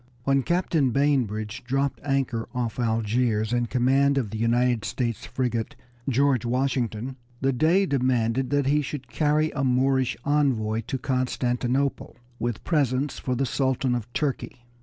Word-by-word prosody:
When 135 +1 +2
Captain 170 -3 +1
Bainbridge 115 -6 0
dropped 135 +2 -1
anchor 135 -5 -1
off 120 -1 -2
Algiers 115 -1 +1
in 120 -1 +1
command 135 +3 +2
of 120 -7 -1
the 110 - -4
United 120 0 +2
States 120 -4 -3
frigate 120 -3 -2 0.3
George 135 -2 +2
Washington, 125 -1 -1 0.2
the 135 0 +1
Dey 165 +9 +3
demanded 130 -3 +1
that 145 -1 +1
he 145 +2 +3
should 135 -1 -6
carry 155 0 +2
a 135 - -2
Moorish 130 0 +2
envoy 125 -7 +1
to 135 - -2
Constantinople 130 +1 -1 0.2
with 120 -1 -3
presents 140 -3 0
for 125 - -2
the 135 +2 0
Sultan 130 -1 0
of 120 -1 -3
Turkey. 130 -3 -3
130 Hz, 140 wpm, -25 LUFS, 120-140 Hz, 0.3 s, Dey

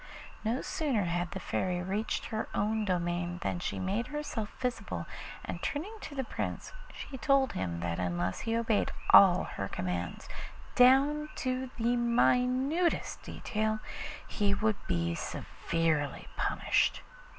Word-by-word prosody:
No 230 +4 0
sooner 270 -10 0
had 175 0 -1
the 190 - -5
Fairy 180 0 -1
reached 200 +4 -1
her 220 - -2
own 215 +1 +1
domain 175 -1 -1
than 175 - -1
she - - -3
made 200 +5 -1
herself 295 -8 -3
visible, 250 -2 -2 0.4
and - - -5
turning 330 +9 -2
to 290 - -7
the 265 - -1
Prince - - -4 0.2
she 265 -3 -8
told 270 +2 +3
him 85 -2 -2
that 85 -1 -2
unless 90 0 -1
he 225 0 -1
obeyed 225 -2 +1 0.2
all 185 -2 +9
her 95 - -4
commands 90 -2 -3 0.5
down 280 +4 +5
to 255 0 -2
the 240 +1 +2
minutest 250 +7 +2
detail 215 0 -1 0.5
he 205 -1 +1
would 215 0 0
be 85 -1 +1
severely 160 - -1
punished. - - +1
215 Hz, 135 wpm, -31 LUFS, 175-255 Hz, 0.5 s, all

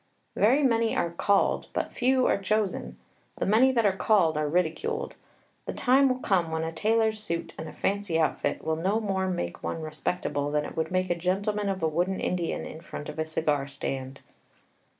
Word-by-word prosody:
Very 260 +8 +4
many 230 -3 +2
are 170 - 0
called, 200 +3 +1
but - - -2
few 255 +1 +2
are 200 - +2
chosen. 190 - -1 0.4
The - - -1
many 230 +6 +5
that 235 -4 +2
are 195 -2 +3
called 190 -6 +3
are 150 -1 0
ridiculed. 180 - -1 0.5
The - - -2
time 270 +2 +4
will 255 - 0
come 185 -9 +1
when 160 0 -2
a 160 - -2
tailor's 220 +4 +1
suit 170 -5 -4
and 160 0 -6
a - - -9
fancy 200 -4 -1
outfit 160 - 0
will 160 0 -1
no 195 +7 +1
more 190 -3 -1
make 85 - -3
one - - -3
respectable 155 -2 -2
than 150 0 0
it - - -8
would 160 - -1
make 185 -1 0
a - - +2
gentleman 200 +4 -1
of 190 -3 -3
a - - +4
wooden 175 +5 0
Indian 175 -2 -2
in 160 - -8
front 150 - -7
of - - -7
a 160 - 0
cigar 150 -3 0
stand. 135 -1 -5
185 Hz, 195 wpm, -27 LUFS, 160-215 Hz, 0.5 s, many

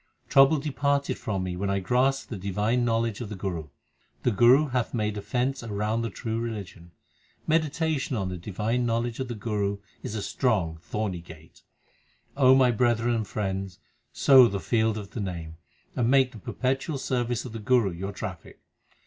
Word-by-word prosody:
Trouble 135 +3 +6
departed 140 0 0
from 95 -4 -2
me 90 -1 -3
when 100 +2 -2
I 100 - +1
grasped 125 +8 +1
the - - -3
divine 105 +6 0
knowledge 115 -2 0
of 115 - -5
the 105 - -5
Guru. 90 -5 -4 0.6
The 125 - +3
Guru 125 +8 +5
hath 125 -1 -1
made 105 -2 -1
a 105 - -4
fence 130 +5 -1
l 115 - -8
round 105 +3 -1
the 115 - -2
true 110 +3 -4
religion: 100 -7 -6 0.6
Meditation 155 -4 0
on 95 -3 -1
the 90 - -4
divine 105 +7 -2
knowledge 115 0 -1
of 130 - -2
the 120 - -5
Guru 105 -2 -1 0.2
is 110 - -5
a 105 - -3
strong 95 - 0
thorny 95 -1 -3
gate. 80 -1 -15 0.7
O 130 -2 +6
my 130 -2 +5
brethren 120 0 +2
and 110 -3 -1
friends, 95 -3 -3 0.3
sow 130 - +7
the 100 -3 -3
field 110 0 +1
of 100 -2 -7
the - - -6
Name, 85 -4 -5 0.4
And 120 -2 +1
make 135 -1 +4
the 110 - -11
perpetual 135 - -2
service 120 -3 -1
of 125 - -7
the 115 - -6
Guru 110 -2 +2
your 95 +4 -5
traffic. 95 -3 -8
115 Hz, 185 wpm, -27 LUFS, 100-125 Hz, 0.7 s, sow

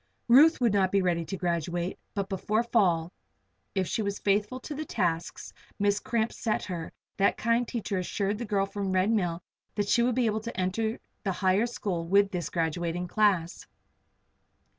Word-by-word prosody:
Ruth 290 +7 +7
would 235 -4 +2
not 190 -2 +2
be 195 -1 +2
ready 170 -2 +1
to 195 - -5
graduate; 175 0 -2 0.2
but 200 -1 -1
before 210 +3 0
fall, 180 -8 +2 0.6
if 190 -1 +1
she - - -1
was 200 -1 -2
faithful 210 +5 0
to 300 - -6
the 300 +2 -4
tasks 175 - -2 0.2
Miss 205 0 +2
Cramp 230 0 -1
set 220 -2 -1
her, 170 -4 -5 0.3
that 200 - +3
kind 230 +1 +1
teacher 210 -5 -2
assured 200 +3 -2
the 240 - -3
girl 200 -2 +1
from 200 0 -4
the 190 - -1
Red 185 +3 +2
Mill 175 -6 0 0.3
that 205 -1 -1
she 235 - +4
would 245 0 +2
be 250 -1 +2
able 220 0 0
to 230 -3 -6
enter 220 +5 -1 0.2
the 195 - 0
higher 190 +5 +2
school 180 -8 -3
with 200 +2 +4
this 180 -3 -3
graduating 170 +1 -2
class. 190 -6 +1
200 Hz, 185 wpm, -28 LUFS, 180-220 Hz, 0.6 s, Ruth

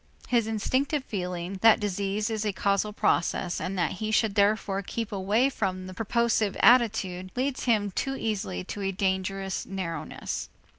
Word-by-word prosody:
His 235 -3 +2
instinctive 260 +6 0
feeling 180 -1 -4
that 225 -1 +7
disease 205 +2 -1
is 220 -1 -1
a 210 - 0
causal 200 +2 0
process, 175 -3 0
and 190 +1 -3
that 175 -3 +1
he 215 - -1
should 215 -1 +2
therefore 200 -1 +2
keep 225 +3 -4
away 205 +6 +2
from 185 -8 -2
the 185 - -8
purposive 225 0 +1
attitude, 210 -7 +3
leads 260 +1 -1
him 210 -4 +2
too 270 +8 -2
easily 210 -6 -2
to 200 +2 -6
a 195 0 0
dangerous 190 0 -1
narrowness. 165 -5 -4
200 Hz, 155 wpm, -27 LUFS, 190-225 Hz, -, that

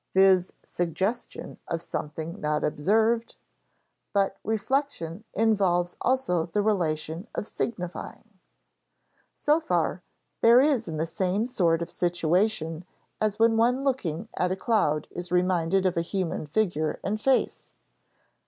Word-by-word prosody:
[Sidenote: 190 0 +7
viz. 180 0 -6
suggestion 190 +7 -3
of 165 - -2
something 160 +2 -5
not 150 0 0
observed] 225 +9 +1
[Sidenote: - - -46
But 195 -1 +1
reflection 220 - -2
involves 190 -6 +2
also 245 -11 +1
the 205 +5 0
relation 165 -3 -1
of - - -2
signifying] 180 -1 -5 1.1
So 300 +2 +2
far 175 - 0 0.4
there 235 +2 +7
is 270 -4 +3
the 160 -2 -2
same 190 +5 -1
sort 170 -9 +1
of 170 - -8
situation 175 -1 0 0.4
as 215 -1 +1
when 225 0 +4
one 250 +4 +2
looking 195 - -1
at 180 0 0
a - - +1
cloud 185 -7 +1
is 175 0 -6
reminded 180 +1 +2
of 185 - +2
a 170 - +1
human 170 -3 -3
figure 160 -3 0
and 215 +2 -2
face. 265 +2 0
185 Hz, 130 wpm, -27 LUFS, 170-225 Hz, 1.1 s, Sidenote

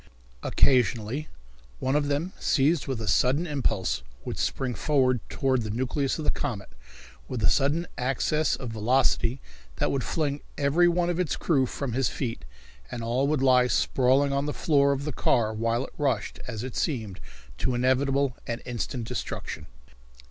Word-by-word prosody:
Occasionally 125 +1 +2 0.5
one 130 - 0
of 145 -1 +2
them, 145 +6 -1
seized 145 +3 +2
with 130 -4 -2
a 110 - -5
sudden 130 - +3
impulse, 110 - -1 0.2
would - - -4
spring 130 -2 -1
forward 130 -3 +2
toward 130 -2 +1
the 110 - -4
nucleus 130 +5 -1
of 155 - -4
the - - +4
comet 115 -9 -4 0.6
with 120 -4 -4
a 105 - +5
sudden 150 +5 +2
access 135 +4 +1
of 125 -4 -6
velocity 120 +2 +1 0.3
that - - 0
would 135 -2 -1
fling 145 -3 -1 0.2
every 145 +5 +4
one 175 0 +2
of 175 - -2
its 180 -4 0
crew 135 -6 +2
from 135 -2 -4
his 130 +1 +1
feet, 115 - -4 0.4
and 115 - -5
all 125 +4 +1
would 145 -2 +1
lie 125 -1 +5
sprawling 135 +3 +2
on 140 +1 0
the 150 - -3
floor 140 -4 +3
of 140 0 -2
the 150 - -3
car 110 -2 +2
while 115 +3 0
it - - -13
rushed, 130 -7 -1
as 115 -2 -5
it 130 -2 -6
seemed, 110 - -2 0.4
to 125 - 0
inevitable 130 +1 +2
and 120 0 -4
instant 120 -1 -4
destruction. - - -5
130 Hz, 170 wpm, -27 LUFS, 120-145 Hz, 0.6 s, a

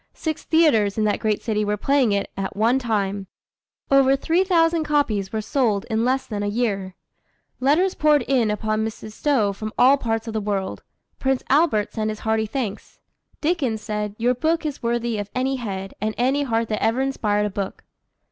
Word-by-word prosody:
Six 315 -2 -3
theatres 240 -12 +3
in 215 - +1
that 210 -1 +1
great 215 -1 -1
city 215 -2 0
were 210 0 -1
playing 275 0 +2
it 200 0 -1
at 195 -1 -4
one 230 +5 +3
time. 200 -5 -2 0.6
Over 275 0 +5
three 325 +5 0
hundred 380 - +2
thousand 330 -2 +3
copies 260 -11 0
were 220 - -2
sold 220 -4 0
in 220 +1 +1
less 260 +2 +1
than 210 -2 -4
a 205 - -1
year. 205 -4 -1 0.6
Letters 310 +9 +3
poured 300 -3 +3
in 245 -4 +1
upon 215 +1 -1
Mrs. 220 0 -6
Stowe 220 -5 +1
from 215 +2 -6
all 265 +3 +6
parts 225 -3 -2
of 225 - -4
the 220 - -1
world. 200 -2 -3 0.4
Prince 265 -1 0
Albert 275 -8 +2
sent 215 -1 -1
his 215 0 -5
hearty 220 0 0
thanks. 220 -4 -5 0.4
Dickens 290 -10 0
said, 210 -2 -3
"Your 245 +2 +2
book 320 +6 0
is 295 -3 -4
worthy 235 -1 -1
of 205 0 -5
any 265 +1 0
head 195 -5 -5
and 215 0 -1
any 265 +4 +2
heart 230 -4 0
that 215 - -2
ever 230 +4 +1
inspired 210 -6 0
a 210 - -2
book." 195 0 -5
225 Hz, 195 wpm, -23 LUFS, 210-270 Hz, 0.6 s, all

